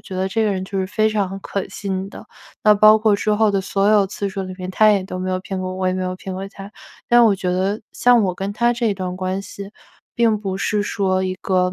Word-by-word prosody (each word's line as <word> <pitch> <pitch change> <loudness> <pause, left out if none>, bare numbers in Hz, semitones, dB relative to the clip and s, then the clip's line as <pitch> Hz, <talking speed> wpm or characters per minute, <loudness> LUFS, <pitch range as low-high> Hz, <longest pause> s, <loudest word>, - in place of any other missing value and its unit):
觉 185 - -8
得 190 +1 -1
这 220 +3 0
个 210 - +1
人 190 0 -3
就 195 0 -4
是 190 - -1
非 215 +2 +1
常 195 -3 -2
可 195 0 -4
信 195 -1 -4
的。 - - -11 0.4
那 210 - +6
包 215 +1 +7
括 215 -1 +3
之 215 - -1
后 215 0 +3
的 200 -1 0
所 195 +1 0
有 210 -2 +4
次 200 0 -4
数 195 0 -4
里 185 0 -7
面， 185 0 -6
他 215 +2 +5
也 195 -2 +1
都 185 -1 -6
没 185 0 -3
有 185 0 -1
骗 190 0 -5
过 185 0 -3
我， 185 - -7
我 185 - -1
也 185 - 0
没 185 0 -2
有 185 0 -2
骗 190 +1 -7
过 190 +1 -5
他。 195 +1 -11 0.4
但 240 0 +6
我 210 -3 +4
觉 180 -1 -2
得 190 +4 -1
像 245 -2 +4
我 185 -2 0
跟 195 +2 -4
他 235 +3 +2
这 230 -3 0
段 185 -1 -4
关 185 +1 -3
系， 200 0 -9 0.4
并 230 -2 +2
不 195 -2 -4
是 210 +1 0
说 190 -2 0
一 185 0 -2
个， 180 -1 +1
195 Hz, 290 characters per minute, -20 LUFS, 185-210 Hz, 0.4 s, 包